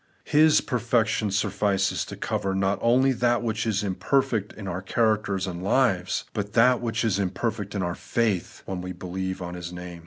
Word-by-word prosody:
His 155 Hz, +1 st, +5 dB
perfection 115 Hz, -4 st, 0 dB
suflfices 100 Hz, -1 st, 0 dB
to -, -, -7 dB
cover 95 Hz, 0 st, -2 dB
not 95 Hz, +1 st, +1 dB
only 130 Hz, +3 st, +4 dB
that 120 Hz, -1 st, +1 dB
which 110 Hz, -1 st, -1 dB
is 105 Hz, -1 st, 0 dB
im 100 Hz, -2 st, -1 dB
perfect 115 Hz, -2 st, 0 dB
in 100 Hz, -2 st, -9 dB
our 90 Hz, 0 st, -3 dB
characters 105 Hz, -1 st, +1 dB
and 90 Hz, -2 st, -5 dB
lives, 95 Hz, -3 st, +1 dB
but 100 Hz, -1 st, -3 dB
that 125 Hz, +1 st, +4 dB
which 115 Hz, -1 st, -1 dB
is 100 Hz, -3 st, +1 dB
imperfect 100 Hz, +2 st, -2 dB
in 95 Hz, -, -1 dB
our 85 Hz, 0 st, -1 dB
faith, 105 Hz, -2 st, -2 dB
when 95 Hz, -2 st, -4 dB
we 90 Hz, 0 st, -5 dB
believe 95 Hz, +1 st, -4 dB
on 90 Hz, 0 st, -6 dB
His 90 Hz, -1 st, -6 dB
name. 90 Hz, -1 st, -8 dB
100 Hz, 185 wpm, -25 LUFS, 95-115 Hz, -, His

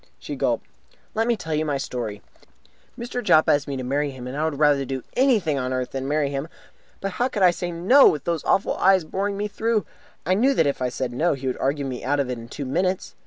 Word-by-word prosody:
She -, -, -6 dB
gulped. -, -, 0 dB, 0.5 s
"Let 225 Hz, +1 st, 0 dB
me 235 Hz, -2 st, +2 dB
tell 160 Hz, -5 st, -5 dB
you 155 Hz, +1 st, +1 dB
my 145 Hz, -3 st, -1 dB
story. 115 Hz, -6 st, -5 dB, 0.7 s
Mr. 245 Hz, +1 st, -4 dB
Jopp 155 Hz, -, +5 dB
asked 145 Hz, 0 st, +2 dB
me 140 Hz, -1 st, -3 dB
to 130 Hz, -, -4 dB
marry 140 Hz, +3 st, 0 dB
him, 130 Hz, -2 st, -9 dB
and 125 Hz, +2 st, -6 dB
I 150 Hz, -, -1 dB
would 155 Hz, -3 st, -2 dB
rather 145 Hz, -2 st, +3 dB
do 130 Hz, -1 st, -4 dB
anything 215 Hz, -, +2 dB
on 130 Hz, 0 st, -2 dB
earth 130 Hz, -1 st, -2 dB
than 135 Hz, 0 st, -4 dB
marry 145 Hz, -1 st, 0 dB
him. 140 Hz, +2 st, -3 dB, 0.5 s
But 195 Hz, -, -2 dB
how 245 Hz, +7 st, 0 dB
could 205 Hz, -6 st, -1 dB
I 180 Hz, -, +7 dB
say 175 Hz, 0 st, -4 dB
'No!' 190 Hz, +12 st, +6 dB
with 150 Hz, -, +1 dB
those 170 Hz, -3 st, -2 dB
awful 195 Hz, -, +1 dB
eyes 190 Hz, -2 st, +4 dB
of 155 Hz, -, -16 dB
his -, -, -21 dB
boring 200 Hz, +1 st, -1 dB
me 205 Hz, +1 st, -1 dB
through? 220 Hz, +1 st, 0 dB, 0.4 s
I 185 Hz, -, +2 dB
knew 260 Hz, +8 st, +3 dB
that 165 Hz, -, +3 dB
if 140 Hz, -2 st, -1 dB
I 125 Hz, -, +1 dB
said 125 Hz, -1 st, -4 dB
'No', 160 Hz, +8 st, +1 dB
he 135 Hz, 0 st, -8 dB
would 130 Hz, -, -1 dB
argue 140 Hz, +1 st, 0 dB
me 130 Hz, -2 st, -5 dB
out 145 Hz, +2 st, 0 dB
of 130 Hz, -2 st, 0 dB
it 125 Hz, -, -4 dB
in 115 Hz, -, -10 dB
two 140 Hz, -, -6 dB
minutes. 180 Hz, +7 st, -1 dB
150 Hz, 260 wpm, -23 LUFS, 135-190 Hz, 0.7 s, I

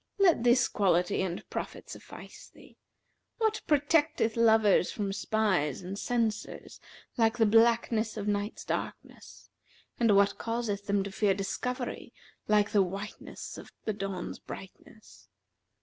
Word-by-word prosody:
Let 370 Hz, -, +4 dB
this 240 Hz, +1 st, +4 dB
quality 180 Hz, -1 st, +1 dB
and 185 Hz, -2 st, -4 dB
profit -, -, -5 dB
suffice -, -, -11 dB
thee. -, -, -18 dB, 0.6 s
What 440 Hz, -1 st, 0 dB
protecteth 290 Hz, -5 st, +2 dB
lovers 220 Hz, -5 st, +4 dB
from 200 Hz, -2 st, -3 dB
spies 190 Hz, -8 st, 0 dB
and 185 Hz, +2 st, -5 dB
censors 225 Hz, -1 st, -3 dB, 0.4 s
like 225 Hz, 0 st, +2 dB
the 225 Hz, -, +4 dB
blackness 225 Hz, 0 st, +3 dB
of 210 Hz, -1 st, -4 dB
night's 205 Hz, +1 st, -2 dB
darkness; -, -, -6 dB, 0.5 s
and 230 Hz, -4 st, +4 dB
what 200 Hz, 0 st, +3 dB
causeth 225 Hz, -4 st, -3 dB
them 200 Hz, -1 st, +1 dB
to 200 Hz, -, -6 dB
fear 195 Hz, 0 st, +1 dB
discovery 250 Hz, +6 st, -4 dB, 0.3 s
like 210 Hz, -1 st, +3 dB
the 205 Hz, -, +4 dB
whiteness 195 Hz, +3 st, -6 dB
of -, -, -12 dB
the 215 Hz, -, 0 dB
dawn's 195 Hz, -3 st, -5 dB
brightness? 210 Hz, +3 st, -12 dB
210 Hz, 130 wpm, -29 LUFS, 195-230 Hz, 0.6 s, Let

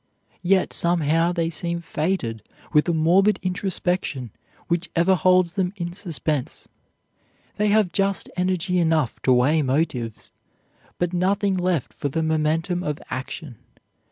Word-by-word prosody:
Yet 185 Hz, +1 st, +2 dB
somehow 165 Hz, 0 st, +2 dB
they 170 Hz, -2 st, -1 dB
seem 170 Hz, +2 st, -2 dB
fated 155 Hz, -, -2 dB, 0.3 s
with 150 Hz, +2 st, +4 dB
a -, -, +4 dB
morbid 175 Hz, +6 st, +3 dB
introspection 180 Hz, -, -2 dB, 0.4 s
which 175 Hz, 0 st, -1 dB
ever 170 Hz, +3 st, +4 dB
holds 185 Hz, 0 st, +3 dB
them 190 Hz, -1 st, -1 dB
in 175 Hz, -3 st, -4 dB
suspense. 160 Hz, -7 st, -3 dB, 0.9 s
They 210 Hz, -, +2 dB
have 210 Hz, -3 st, +3 dB
just 195 Hz, 0 st, 0 dB
energy 180 Hz, 0 st, 0 dB
enough 160 Hz, -7 st, +1 dB
to 130 Hz, -, +2 dB
weigh 135 Hz, +6 st, +4 dB
motives, 130 Hz, -5 st, -2 dB, 0.7 s
but 175 Hz, 0 st, -1 dB
nothing 195 Hz, +2 st, +1 dB
left 180 Hz, -6 st, -1 dB
for 145 Hz, -, -3 dB
the 160 Hz, +4 st, -1 dB
momentum 160 Hz, +3 st, 0 dB
of 150 Hz, -4 st, -2 dB
action. 130 Hz, 0 st, -6 dB
170 Hz, 130 wpm, -23 LUFS, 155-185 Hz, 0.9 s, with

